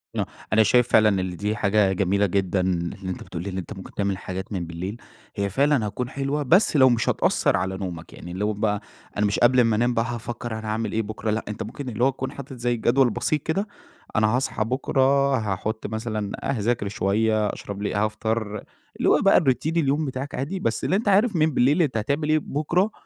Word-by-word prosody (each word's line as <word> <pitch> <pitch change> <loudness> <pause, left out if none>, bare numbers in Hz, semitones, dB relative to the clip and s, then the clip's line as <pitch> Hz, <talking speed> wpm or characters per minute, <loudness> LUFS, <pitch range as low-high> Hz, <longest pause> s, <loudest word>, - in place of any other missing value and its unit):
آه، - - 0 0.3
أنا 110 - +6
شايف 125 +2 +4
فعلًا 110 -1 +5
إن 90 -1 -4
دي 105 +4 -2
حاجة 100 -1 +2
جميلة 100 +2 +1
جدًا، 95 0 0
إن 85 -2 -1
أنت 90 - -5
بتقول 85 0 -6
لي 100 - -4
إن 95 - -5
أنت 95 +3 -5
ممكن 95 -2 -10
تعمل 100 -2 -1
حاجات 95 +1 -6
من 90 -3 -2
بالليل، 90 +6 -5 0.4
هي 100 -1 -1
فعلًا 140 0 +2
هتكون 125 +4 -4
حلوة، 140 +2 -2
بس 175 - +4
لو 130 -1 +7
مش 120 -2 +1
هتأثّر - - +2
على 95 +1 -2
نومك 85 -4 -6
يعني 85 - -9
لو 105 +3 -1
بقى 105 0 -1 0.4
أنا 105 - +2
مش 100 - 0
قبل 125 +1 +5
اما 115 -3 +4
أنام 120 +3 +2
بقى 115 0 +1
هافكر 120 0 -5
أنا 110 - -7
هاعمل 110 -1 -2
إيه 110 - 0
بكرة 110 +1 -4
لأ، 110 - -2
أنت 105 +1 -4
ممكن 130 +5 -6
اللي 120 +1 -2
هو 135 - +5
تكون 130 0 -4
حاطط 135 0 -9
زي 120 -1 -1
جدول 125 +3 +3
بسيط 125 +6 -1
كده، 195 +6 -1 0.5
أنا 110 -1 +4
هاصحى 120 -1 0
بكرة 135 +2 +2
هاحُطّ 110 +1 -3
مثلًا 110 -2 -3
أ - - -3
هاذاكر 115 -3 0
شوية، 105 +2 +1
أشرب 100 0 -6
لي 105 - -2
هافطر، 110 0 -1 0.3
اللي - - +2
هو - - +4
بقى 195 - +6
الRoutine 155 +4 0
اليوم 150 0 +1
بتاعك 135 +1 -5
عادي، 150 +9 -3
بس 115 -8 -1
اللي 185 - +2
أنت 215 +2 -1
عارف 205 +1 +4
من 155 - +4
بالليل 140 +8 +3
أنت 135 -8 +1
هتعمل 145 +7 -1
إيه 155 - +4
بُكرة، 170 +8 0
110 Hz, 215 wpm, -24 LUFS, 100-135 Hz, 0.5 s, لو